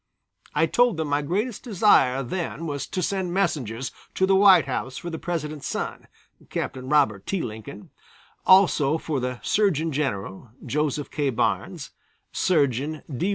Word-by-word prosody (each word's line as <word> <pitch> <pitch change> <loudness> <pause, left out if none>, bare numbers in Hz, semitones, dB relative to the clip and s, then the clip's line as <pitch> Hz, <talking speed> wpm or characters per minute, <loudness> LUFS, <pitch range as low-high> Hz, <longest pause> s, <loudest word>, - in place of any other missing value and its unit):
I - - +4
told 245 -7 +2
them 160 -2 -2
my 145 +1 +1
greatest 200 - -2
desire 175 - +3
then 165 +4 -4
was 145 -3 -4
to 185 - -3
send 185 -1 -2
messengers 135 - -1 0.2
to 190 - +3
the 195 0 +3
White 190 -4 +7
House 130 -1 -4
for 175 - -6
the 160 - -5
President's 155 -4 -4
son, - - -4 0.4
Captain 130 0 -4
Robert 135 -10 +2
T. 195 - -1
Lincoln, 105 -1 -8 0.5
also 165 -6 +5
for 155 -3 -3
the 125 0 -3
Surgeon 165 -7 +1
General, 110 -7 -3 0.2
Joseph 150 -1 -1
K. 145 -2 0
Barnes, 120 - -2 0.4
Surgeon 145 -2 0
D. 180 +11 0
150 Hz, 150 wpm, -24 LUFS, 130-185 Hz, 0.5 s, White